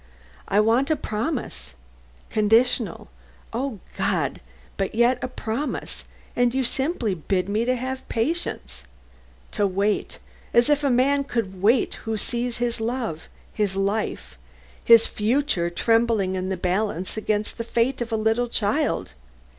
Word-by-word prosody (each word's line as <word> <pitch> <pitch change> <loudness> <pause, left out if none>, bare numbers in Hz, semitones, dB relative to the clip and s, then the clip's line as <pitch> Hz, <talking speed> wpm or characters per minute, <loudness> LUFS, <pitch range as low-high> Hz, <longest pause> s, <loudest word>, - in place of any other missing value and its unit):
I 200 - +3
want 230 +6 +3
a 315 - +3
promise 215 - -4 0.6
conditional, 225 -1 +2 0.4
O 250 -1 -2 0.2
God! - - 0 0.3
but 195 +2 -2
yet 240 +2 +3
a - - 0
promise; 250 +3 -4 0.3
and 245 0 +2
you 265 - +2
simply 265 - 0
bid 185 +2 -1
me 215 +3 0
to 255 +1 +2
have 260 +1 -5
patience; 225 - -2 0.7
to 205 - +1
wait 200 +2 -1 0.4
as 240 +5 +5
if 295 0 +2
a 280 - +3
man 275 +3 +3
could 195 -8 -3
wait 225 +5 +3 0.2
who 220 - 0
sees 240 +3 -2
his 240 -1 -1
love, 225 -8 -3 0.2
his 205 -3 0
life, 195 - -2 0.4
his 230 -1 +7
future 215 - 0
trembling 225 0 +2
in 185 0 -2
the 190 - -1
balance 185 0 -1
against 215 0 -2
the - - -1
fate 235 +3 0
of 235 0 -3
a - - +1
little 220 +3 +1
child. 230 - 0
225 Hz, 140 wpm, -24 LUFS, 200-250 Hz, 0.7 s, his